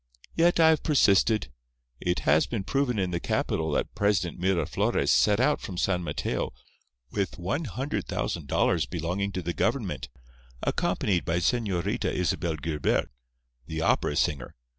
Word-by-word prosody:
Yet 170 +1 +3
I 160 -1 +7
have 160 - +3
persisted. 110 - +3 0.5
It 90 0 -1
has 75 +2 +3
been 110 -5 -3
proven 130 +2 0
in 95 -2 0
the 85 - -1
capital 80 -1 -1
that - - -1
President 95 -4 0
Miraflores 95 -1 +1
set 105 0 +4
out 145 +4 +2
from 90 - -6
San 90 -1 0
Mateo - - -2 0.6
with 100 -3 -2
one 95 - -2
hundred 130 +6 -3
thousand - - -3
dollars - - +1
belonging 90 +4 -2
to 95 - -3
the 85 +1 -2
government, - - -1 0.5
accompanied 90 -4 0
by 85 0 0
Señorita 100 0 0
Isabel 85 -1 -1
Guilbert, 75 -3 -1 0.6
the 80 0 -3
opera - - +1
singer. 70 -4 -1
95 Hz, 145 wpm, -27 LUFS, 85-110 Hz, 0.6 s, I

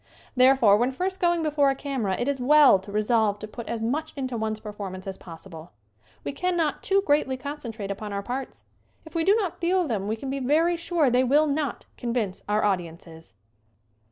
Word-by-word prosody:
Therefore, 255 -5 +6
when 245 +4 +1
first 370 +7 -3
going 345 -2 +2
before 295 -2 +2
a 270 - 0
camera 260 -9 -2
it 245 - -2
is 280 -1 -1
well 280 -4 +6
to 195 +2 -11
resolve 215 0 +2
to 215 - -8
put 230 +1 -8
as 230 -1 -3
much 280 +8 -2
into 260 -3 -3
one's 220 -1 -2
performance 200 -3 -7
as 195 -1 -4
possible. 165 - -11 0.5
We - - -3
cannot 335 0 -1
too 390 0 +2
greatly 290 -3 +2
concentrate 245 -7 -6
upon 205 +1 -6
our 200 0 -3
parts. 255 +4 -5 0.4
If 320 - -13
we 330 -1 0
do 395 +5 +4
not 400 -6 -2
feel 360 +1 +2
them 205 -6 -2
we 220 - -1
can 265 +4 -6
be 275 - -2
very 315 +6 +2
sure 335 -5 +1
they 250 +1 +3
will 290 +5 +4
not 290 -2 -2
convince 230 -6 -2
our 210 +1 +2
audiences. 165 - -4
255 Hz, 195 wpm, -25 LUFS, 210-300 Hz, 0.5 s, Therefore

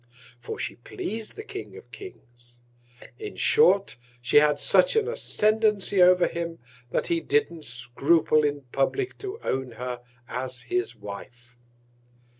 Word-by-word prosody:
For 120 - -6
she - - -5
pleas'd 215 - -5
the 430 - -7
King 410 -2 -8
of - - -15
Kings: 120 - -11 0.6
In 425 -1 -7
short, 205 - +3 0.2
she 120 +3 +2
had 150 0 +5
such 185 - +5
an 445 -1 +2
Ascendancy 215 - +2
over 180 0 +6
him, 170 0 -4 0.3
that - - -1
he 340 -1 0
didn't 330 - 0
scruple 135 +6 +2
in 145 -1 0
publick 375 - 0
to 405 +2 -6
own 130 -2 -2
her 125 +1 -5 0.3
as 125 -1 -4
his 120 0 -2
Wife. 120 +4 -10
155 Hz, 135 wpm, -26 LUFS, -, 0.6 s, over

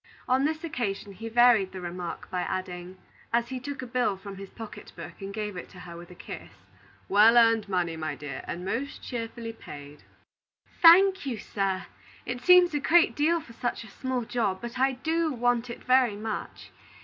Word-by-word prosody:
On 260 +2 +3
this 315 +2 -2
occasion 215 -10 -3
he 225 +4 -7
varied 230 -5 +5
the 190 - -6
remark 175 0 -6
by 180 - -1
adding, 185 0 -5 0.3
as 235 0 +1
he 260 -1 -4
took 280 +1 -6
a - - -4
bill 240 -5 0
from 195 0 -9
his 195 0 -9
pocket 225 -2 -10
book - - -10
and 195 0 -5
gave 210 -1 -4
it 180 - -7
to 185 - -13
her 170 -1 -9
with 175 0 -11
a 180 - -12
kiss: - - -9 0.6
"Well 215 +4 +6
earned 225 -3 +4
money, 175 -3 0
my 155 -2 -4
dear, 145 -3 -7
and 180 +2 -5
most 260 +9 -3
cheerfully 230 -1 -5
paid." 145 -7 -11 0.8
"Thank 370 0 +7
you, 245 -4 -2
sir! 195 -2 -2 0.4
It 245 0 -4
seems 360 +1 +6
a 295 - +1
great 340 +6 +4
deal 325 +3 +2
for 230 - -14
such 245 0 -3
a 220 - -12
small 260 -2 -1
job. 220 -5 -1
But 240 +1 -7
I 265 +1 +3
do 320 +5 0
want 245 -1 0
it 235 - -8
very 255 -4 +4
much. 215 +1 -6
230 Hz, 195 wpm, -27 LUFS, 190-260 Hz, 0.8 s, Thank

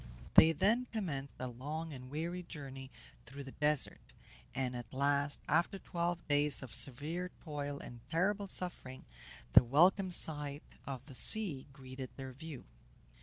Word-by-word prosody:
They 160 - +9
then 215 +10 +2
commenced 145 -11 -3
a 130 - -4
long 150 +6 -5
and 130 -1 -9
weary 170 +5 -3
journey 135 -6 -8 0.4
through 140 +3 -8
the 135 - -9
desert, 150 0 0 0.5
and 125 -1 -1
at 120 -1 -7
last, 140 +1 +2
after 170 +5 +2
twelve 175 -2 -3
days 145 -1 +3
of 120 -4 -9
severe 145 +9 +1
toil 145 -3 -4
and 120 - -9
terrible 195 +4 +1
suffering, 175 -9 -2 0.5
the - - +10
welcome 175 - +4
sight 145 -4 0 0.2
of 135 -2 -5
the 140 - -11
sea 165 - +2
greeted 130 -1 -8
their 135 -1 -6
view. 150 0 -8
145 Hz, 145 wpm, -35 LUFS, 135-170 Hz, 0.5 s, the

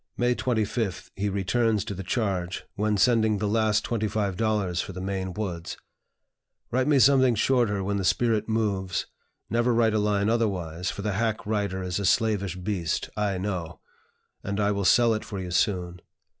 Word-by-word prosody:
May 120 0 +2
25th 110 -5 -2
he 100 +1 -1
returns 105 +2 +1
to 110 - -4
the 95 - -6
charge, 95 -4 -2
when 105 0 0
sending 110 0 +3
the 105 - -2
last 110 0 +2
twenty 110 -2 -1
five 100 -2 -1
dollars 100 -4 0
for 95 - -7
the 90 - -7
"Maine 95 0 -3
Woods": 90 -4 -5 0.9
"Write 130 +2 +1
me 150 -2 +4
something 130 -2 +5
shorter 110 -4 +1
when 100 +1 -1
the 95 - -2
spirit 110 +2 +1
moves 100 -5 -1 0.4
(never 120 +2 +1
write 115 -2 +3
a 110 - +2
line 105 -1 +1
otherwise, 95 -7 -1
for 100 - -5
the 105 -1 -1
hack 110 +2 -1
writer 100 -3 -1
is 90 +1 -2
a 100 - -2
slavish 105 -5 +1
beast, 90 -3 -2
I 105 -2 0
know), 90 -4 -4 0.6
and 100 +1 -3
I 105 0 +2
will 100 -1 -1
sell 120 +3 +5
it 110 - -3
for 100 - -6
you 90 -1 -5
soon. 90 -1 0
105 Hz, 180 wpm, -26 LUFS, 95-110 Hz, 0.9 s, something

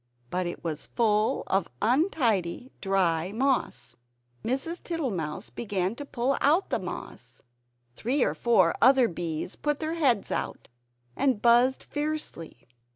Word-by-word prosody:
But 180 0 -1
it 175 - -6
was 160 -3 -4
full 215 -2 +1
of 195 -2 0
untidy 245 - +1
dry 185 -3 +1
moss. 245 - -1 0.5
Mrs. 270 +8 -2
Tittlemouse 195 - -3
began 200 -4 -2
to 290 - -6
pull 265 0 -1
out 320 +7 +3
the - - +1
moss. - - -8 0.5
Three 255 +4 +1
or - - +1
four 190 -8 +3
other 260 -1 +6
bees 170 0 -4
put 295 -1 -1
their 315 0 -2
heads 265 -11 +1
out, - - -3 0.5
and 265 -6 +1
buzzed 240 +3 +4
fiercely. 290 - -5
235 Hz, 130 wpm, -27 LUFS, 185-275 Hz, 0.5 s, other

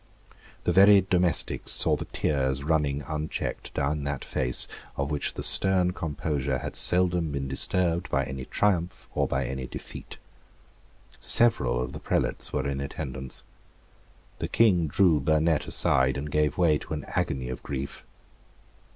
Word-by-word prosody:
The - - +1
very 100 +1 +6
domestics 90 -4 +2
saw - - +6
the - - -6
tears 65 -2 -2
running 75 -2 0
unchecked 75 0 -5
down 70 +1 -1
that 70 -1 -4
face, 60 -1 +1 0.3
of 70 +1 -2
which 75 - -2
the - - -5
stern 90 -2 +4
composure 70 -5 -3
had 65 - -7
seldom 90 -3 +3
been 70 -1 -4
disturbed 85 +5 +1
by 70 +1 0
any 65 0 -7
triumph 90 -4 -1
or - - 0
by - - -2
any 65 -1 -5
defeat. - - -9 1.0
Several 65 - +3
of 65 +2 -4
the 75 - -7
prelates - - -1
were 65 - -2
in 70 0 -3
attendance. 65 -2 -4 1.0
The - - -3
King 90 -8 +2
drew 80 0 +3
Burnet 80 +2 +1
aside, 65 0 +2
and 75 +2 -6
gave 75 0 0
way 80 -4 +2
to - - -8
an 75 - -7
agony 65 -2 -2
of 65 - -6
grief. 70 -1 -6
75 Hz, 150 wpm, -26 LUFS, 65-85 Hz, 1.0 s, very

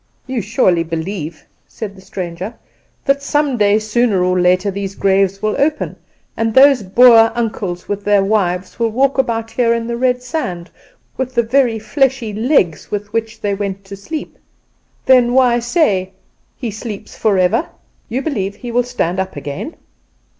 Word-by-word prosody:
"You 260 -3 -2
surely 190 -5 +2
believe," 165 -1 -5 0.2
said 210 -3 -7
the 190 - -14
stranger, 185 +3 -6 0.5
"that 275 0 +2
some 290 -1 0
day, 205 -2 +3
sooner 215 -3 +1
or 180 0 +1
later, 185 +3 +2
these 195 0 -5
graves 195 0 +1
will 215 0 +1
open, 300 +2 0 0.4
and 225 -1 -1
those 270 -2 +7
Boer 225 +3 +6
uncles 205 -6 -3
with 205 0 -3
their 205 -1 +3
wives 185 -2 -1
walk 255 +4 +1
about 225 -3 -1
here 235 -2 +2
in 230 0 -3
the 235 0 -3
red 250 0 +1
sand, 190 - -4 0.5
with 260 0 -3
the 235 - +3
very 240 -1 +2
fleshly 255 0 0
legs 210 - +1
with 205 0 -5
which 225 -1 -2
they 205 -1 0
went 195 -1 -4
to 195 0 -8
sleep? 300 +11 -7 0.7
Then 250 -2 +4
why 250 -2 +4
say, 210 - +1 0.4
'He 240 -4 -4
sleeps 215 -1 -8
forever?' 205 - +1 0.4
You 255 +4 -2
believe 200 -10 -2
he 240 +2 -7
will 245 +1 +3
stand 190 -7 -2
up 190 0 -3
again?" 145 - -6
215 Hz, 160 wpm, -17 LUFS, 195-245 Hz, 0.7 s, those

